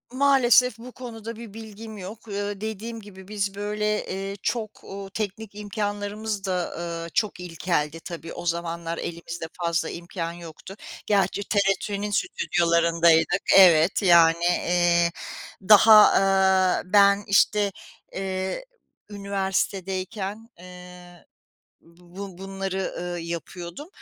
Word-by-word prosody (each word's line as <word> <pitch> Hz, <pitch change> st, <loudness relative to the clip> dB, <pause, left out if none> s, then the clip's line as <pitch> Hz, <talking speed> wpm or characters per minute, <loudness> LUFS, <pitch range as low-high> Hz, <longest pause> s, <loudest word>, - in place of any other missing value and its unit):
Maalesef 250 Hz, -3 st, +4 dB
bu 245 Hz, +2 st, -10 dB
konuda 230 Hz, -3 st, -8 dB
bir 225 Hz, -3 st, -10 dB
bilgim 220 Hz, 0 st, -9 dB
yok. 205 Hz, +4 st, -9 dB
Iıı, 205 Hz, 0 st, -4 dB
dediğim 220 Hz, +1 st, -5 dB
gibi 190 Hz, -2 st, -13 dB
biz 200 Hz, -2 st, -3 dB
böyle, 210 Hz, +1 st, -2 dB
eee, 195 Hz, +1 st, -5 dB
çok, 220 Hz, -3 st, -3 dB
ooo, 195 Hz, 0 st, -8 dB
teknik 205 Hz, 0 st, -5 dB
imkânlarımız 205 Hz, 0 st, -4 dB
da, 180 Hz, -2 st, -2 dB
ııı, 170 Hz, -1 st, -5 dB
çok 210 Hz, -4 st, 0 dB
ilkeldi 165 Hz, -2 st, -2 dB
tabii. 165 Hz, -1 st, -8 dB
O -, -, -8 dB
zamanlar 170 Hz, 0 st, -3 dB
elimizde 170 Hz, 0 st, -6 dB, 0.2 s
fazla 170 Hz, 0 st, 0 dB
imkân 170 Hz, -1 st, -5 dB
yoktu. 170 Hz, +2 st, -11 dB, 0.3 s
Gerçi 200 Hz, -1 st, +1 dB
TRT'nin 200 Hz, 0 st, 0 dB
stüdyolarındaydık 170 Hz, -, +2 dB, 0.2 s
Evet, 170 Hz, -1 st, +6 dB
yani, 170 Hz, -2 st, +5 dB
eee, 175 Hz, -1 st, +2 dB, 0.6 s
daha, 215 Hz, +1 st, +9 dB, 0.2 s
aaa, 190 Hz, -1 st, +3 dB
ben, 200 Hz, +1 st, +4 dB
işte, 200 Hz, 0 st, +3 dB, 0.4 s
eee, 190 Hz, -, -3 dB, 0.4 s
üniversitedeyken, 195 Hz, +1 st, -3 dB
eee, 180 Hz, -1 st, -13 dB, 0.8 s
bu 180 Hz, +1 st, -10 dB
bunları, 195 Hz, 0 st, -4 dB
ııı, 175 Hz, -1 st, -4 dB
yapıyordum. 170 Hz, -, -7 dB
195 Hz, 110 wpm, -25 LUFS, 175-210 Hz, 0.8 s, daha